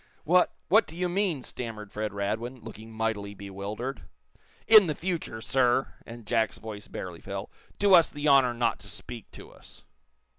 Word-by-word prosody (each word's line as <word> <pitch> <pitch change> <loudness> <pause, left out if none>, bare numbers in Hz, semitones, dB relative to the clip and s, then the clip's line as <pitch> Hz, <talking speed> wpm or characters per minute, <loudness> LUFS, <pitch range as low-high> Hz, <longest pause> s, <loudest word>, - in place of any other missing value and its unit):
"What 180 +3 +3
what 215 +3 +5
do 160 - -10
you 180 +1 0
mean?" 175 -6 0
stammered 110 -5 -6
Fred 105 0 -3
Radwin, 110 +5 -3
looking 110 0 -10
mightily 110 -2 -2
bewildered. 100 +7 -5 0.6
"In 215 -4 +8
the 150 - -1
future, 165 -11 -3
sir," 130 +1 +2
and 115 -1 -10
Jack's 110 -2 +1
voice 105 -2 -8
barely - - -7
fell, - - -6 0.3
"do 200 -1 +4
us 170 -3 +7
the 145 +1 -3
honor 135 -4 +5
not 115 -1 0
to - - -10
speak 120 -3 -8
to - - -11
us." - - -17
120 Hz, 170 wpm, -28 LUFS, 110-155 Hz, 0.6 s, In